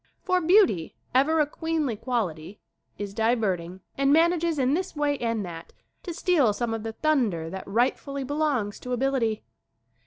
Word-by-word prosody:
For 365 -1 +1
beauty, 345 - +3 0.2
ever 295 +5 +3
a - - +3
queenly 310 -4 -2
quality, 205 -7 -3 0.4
is 200 -1 -5
diverting 195 -6 0 0.2
and 275 0 +3
manages 335 +1 +3
in 265 0 +2
this 360 +2 -2
way 295 -1 +1
and 230 -3 -1
that 170 -1 -9 0.3
to 355 - -6
steal 330 - +2
some 235 +1 -2
of 225 - -3
the 225 0 -5
thunder 220 - 0
that 190 0 -7
rightfully 260 +6 0
belongs 275 -7 -1
to 250 - -5
ability. 245 -4 0
250 Hz, 155 wpm, -26 LUFS, 210-305 Hz, 0.4 s, beauty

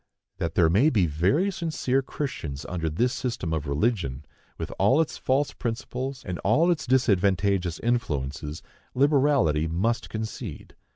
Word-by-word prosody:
That - - -2
there 85 - +5
may 105 - +4
be 105 - +3
very 95 - +1
sincere 155 -7 0
Christians 80 - -5
under 85 -3 -2
this 120 +11 +1
system 115 -12 -3
of 80 -2 -2
religion, 75 - -1 0.3
with - - -5
all 135 - +4
its 160 - -1
false 140 +3 +1
principles 125 +3 -4
and 90 -2 -4
all 140 - +3
its 155 -5 -2
disadvantageous 100 -7 +2
influences, 75 - -2 0.3
liberality 135 - +3
must 100 +9 -1
concede. 110 - -6
110 Hz, 135 wpm, -26 LUFS, 80-130 Hz, 0.3 s, there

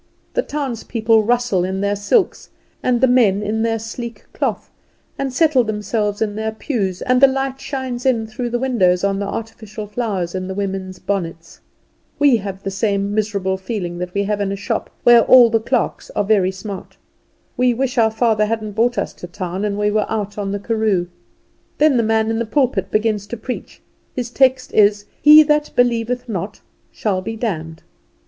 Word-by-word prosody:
The - - +2
townspeople 230 - 0
rustle 235 -4 +1
in 190 +1 -2
their 200 0 0
silks, 205 - 0 0.3
and 250 -1 +1
the 260 - +6
men 220 -6 +3
in 215 +2 -1
their 225 0 +1
sleek 230 +2 -7
cloth, - - -2 0.4
and 275 -1 -3
settle 285 -2 +3
themselves 210 0 -1
in 205 -1 -3
their 220 +1 -2
pews, 210 -5 -3
and 255 0 +2
the 275 - +9
light 270 0 -2
shines 260 -3 -4
in 240 -4 +1
through 230 +3 -4
the 240 - -1
windows 195 -9 +2
on 195 0 +1
the 200 - -2
artificial 220 0 -6
flowers 205 -5 -3
in 185 -1 -3
the 190 - -5
women's 190 -2 -4
bonnets. 165 -5 -4 0.6
We 285 -4 +5
have 195 -2 -7
the 195 - -3
same 200 0 -1
miserable 200 -3 -1
feeling 185 -3 -4
that 180 0 -4
we 200 - +1
have 205 0 -1
in 195 -1 -1
a - - -2
shop 200 - -3
where 240 -1 +7
all 240 -1 +7
the 225 - +3
clerks 235 +2 -2
are - - +1
very 200 -3 +3
smart. 190 0 -8 0.6
We 250 -1 +2
wish 260 0 -1
our 220 -1 +5
father 220 -1 +1
hadn't 215 -1 -3
brought 235 +4 +1
us - - -2
to 175 - -9
town, 180 +2 -5
and 205 -1 -1
we 210 0 +1
were 215 0 +1
out 210 -2 -3
on 200 -2 -3
the 205 - -1
karoo. 205 -4 0 0.7
Then 300 -2 +4
the - - +4
man 220 0 +1
in 225 - -1
the 235 - -2
pulpit 235 -7 0
begins 215 -1 0
to 235 - -6
preach. 250 +3 -7 0.3
His 245 -2 -3
text 260 0 +2
is 205 -1 +4 0.2
"He 300 +1 +9
that 300 0 +1
believeth 245 0 +1
not 205 -1 -5 0.3
shall 195 -4 -1
be 225 +4 -5
damned." 165 -8 -4
220 Hz, 190 wpm, -19 LUFS, 200-245 Hz, 0.7 s, the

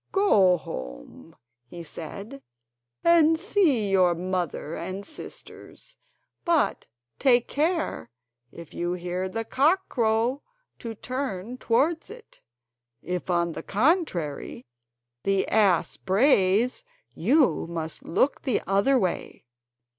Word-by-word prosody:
"Go 200 - +4
home," - - -9 0.3
he 170 +6 -9
said, 200 - -8 0.6
"and 325 -1 +5
see 320 - +2
your 180 -3 +4
mother 175 -3 -3
and 190 +3 -5
sisters; 310 - -10 0.5
but 340 -3 +1 0.3
take 245 -3 +4
care 315 - -1 0.4
if 170 -2 -12
you 175 +1 -2
hear 180 +1 -3
the 225 +3 -4
cock 320 +11 +2
crow 230 +3 +1 0.4
to 230 -1 -6
turn 250 -2 -5
towards 310 +8 +1
it; 455 +2 -14 0.6
if 180 +1 -4
on 170 -1 +1
the - - -6
contrary 200 - -1 0.6
the 195 +3 +1
ass 200 -5 +2
brays, 210 - +2 0.3
you 260 - +2
must 160 -2 -5
look 265 - +1
the 255 -6 0
other 200 +9 +3
way." 185 - -3
210 Hz, 110 wpm, -26 LUFS, 180-280 Hz, 0.6 s, and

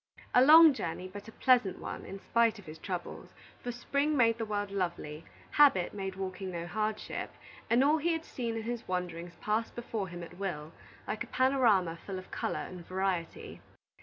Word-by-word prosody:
A 250 - +7
long 315 +2 +9
journey, 180 -5 -4
but 200 +3 -10
a - - -9
pleasant 245 -6 +3
one, - - -6
in 195 +1 -7
spite 230 +2 +2
of 205 - -13
his 155 0 -10
troubles; 180 -1 -6 0.3
for 245 - -2
spring 280 +5 0
made 230 -2 +4
the 225 - -1
world 205 -1 -2
lovely, 170 -5 -3 0.3
habit 275 -12 +5
made 195 -2 -4
walking 190 0 -5
no 170 -2 -4
hardship, 215 +3 -3 0.4
and 235 +3 +4
all 300 +3 +4
he 340 +3 +1
had 325 0 -3
seen 235 -3 -4
in 225 - -4
his 235 0 -4
wanderings 175 -1 -4
passed 215 +2 -1
before 225 -4 -3
him 175 -1 -7
at 175 +2 -11
will, 160 -6 -4 0.4
like - - -2
a - - -11
panorama 230 -11 +2
full 195 -2 -5
of 185 - -10
color - - -2
and 180 -2 -9
variety. 185 -3 -3
200 Hz, 190 wpm, -31 LUFS, 180-240 Hz, 0.4 s, long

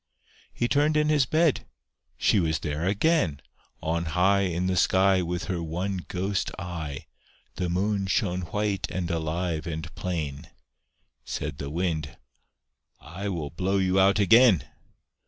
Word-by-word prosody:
He 120 - -1
turned 145 +3 +2
in 150 0 +2
his 145 -4 +3
bed; 160 0 +2 0.5
she 105 - +3
was 80 -3 +1
there 75 +2 -3
again! 100 - +2 0.4
On 85 +1 -1
high 95 +4 +2
In 85 +2 -1
the 95 0 0
sky 95 +1 +3
With 90 +1 -3
her 90 -3 -3
one 90 +3 -3
ghost 95 +2 -1
eye, 80 -6 -5 0.5
The 90 -1 -1
Moon 100 +2 0
shone 95 -2 0
white 105 -1 -1
and 90 -1 -3
alive 80 0 -2
and 80 0 -5
plain. 75 -6 -4 0.7
Said - - -5
the 70 - -4
Wind 80 -2 -2 0.8
"I 95 +6 -6
will 80 -6 -4
blow 95 +4 0
you 95 0 +2
out 100 +2 +5
again." 105 - +6
90 Hz, 140 wpm, -26 LUFS, 80-100 Hz, 0.8 s, again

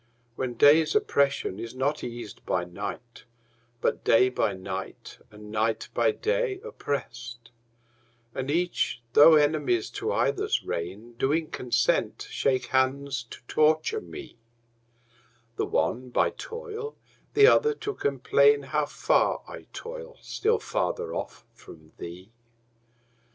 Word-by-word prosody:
When 125 -1 -3
day's 150 +6 +5
oppression 140 - +1
is 115 +2 -7
not 140 +3 -1
eas'd 120 -4 -7
by 90 - 0
night, 100 +7 -7 0.6
But - - 0
day 125 +3 +5
by 110 -5 0
night 95 0 -7
and 105 0 -12
night 110 +1 0
by 120 - +3
day 450 - -1
oppress'd, 120 - -5 0.8
And 130 +1 -4
each, 170 -6 0
though 155 +2 +9
enemies 145 -6 +2
to - - -3
either's - - +1
reign, 100 +8 -5
Do 135 - +2
in 160 0 0
consent 125 -1 0
shake 130 -2 +1
hands 130 -1 0
to - - -11
torture 155 - +2
me, 370 - -10 1.2
The - - 0
one 125 +2 0
by - - +2
toil, 455 -2 -7 0.4
the 420 0 +8
other 450 0 +5
to 420 -1 -4
complain 140 - +3
How 145 +2 -1
far - - +1
I - - -10
toil, 485 +1 -8
still 450 +2 0
farther 470 -1 -2
off - - -6
from 80 -1 -15
thee. 90 +5 -9
135 Hz, 125 wpm, -27 LUFS, 115-175 Hz, 1.2 s, though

